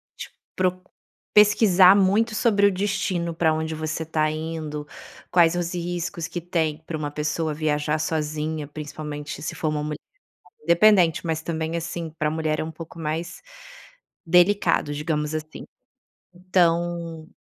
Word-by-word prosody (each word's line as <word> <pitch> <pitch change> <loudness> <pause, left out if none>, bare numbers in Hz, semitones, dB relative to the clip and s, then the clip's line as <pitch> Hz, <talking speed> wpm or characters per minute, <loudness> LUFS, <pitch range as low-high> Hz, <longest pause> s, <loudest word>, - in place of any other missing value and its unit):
tipo, - - -9 0.2
pro 185 0 0 0.5
pesquisar 200 -3 +6
muito 205 +3 +3
sobre 205 -4 +3
o - - +2
destino 185 -3 -1
pra 160 -1 +2
onde 160 0 -2
você 155 +1 -3
tá 155 -1 +1
indo, 155 -1 -5 0.4
quais 170 -1 +4
os 175 0 -2
riscos 175 0 -3
que 175 - -5
tem 160 -3 -1
pra 160 - -5
uma 145 -1 -3
pessoa 150 +1 -2
viajar 150 0 0
sozinha, 155 -1 -2
principalmente 150 0 -7
se - - -4
for 160 - -2
uma 150 -1 -2
mu 150 0 -3 0.7
independente, 170 0 +4
mas 160 -1 -1
também, 160 0 -3
assim, 165 0 -4
pra 155 - +1
mulher 155 -1 -1
é - - 0
um 160 - -6
pouco 165 +1 -10
mais 160 +3 -4 0.8
delicado, 175 -3 +3
digamos 150 0 -2
assim. 155 0 -6 0.7
Então 170 -2 0
160 Hz, 140 wpm, -24 LUFS, 155-175 Hz, 0.8 s, pesquisar